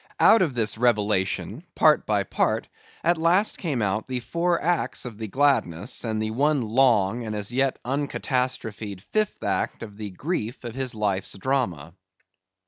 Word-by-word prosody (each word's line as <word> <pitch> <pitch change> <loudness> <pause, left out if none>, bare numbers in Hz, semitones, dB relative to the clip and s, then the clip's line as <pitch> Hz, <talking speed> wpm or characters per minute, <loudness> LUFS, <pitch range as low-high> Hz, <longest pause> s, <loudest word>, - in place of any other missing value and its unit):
Out 225 - +7
of 155 -8 +1
this 110 -1 0
revelation, 105 -5 +1
part - - +4
by - - +2
part, - - 0 0.4
at 170 0 +2
last 180 +6 +2
came 140 - -1
out 105 +2 -1
the 130 -1 -2
four 170 +8 0
acts 175 -4 -1
of 115 -3 -8
the 110 - -4
gladness, 105 - +1
and 110 -2 -1
the 110 0 -2
one 140 +3 +2
long, 120 -2 +3
and 110 -1 -4
as 105 +1 -3
yet 135 +1 +1
uncatastrophied 125 -7 -2
fifth 215 - -2
act 95 +2 -1
of 105 -2 -10
the 105 -1 -5
grief 120 - -4
of 120 -2 -6
his 130 -2 -3
life's 100 -3 -1
drama. 95 - -1
120 Hz, 160 wpm, -25 LUFS, 105-140 Hz, 0.4 s, Out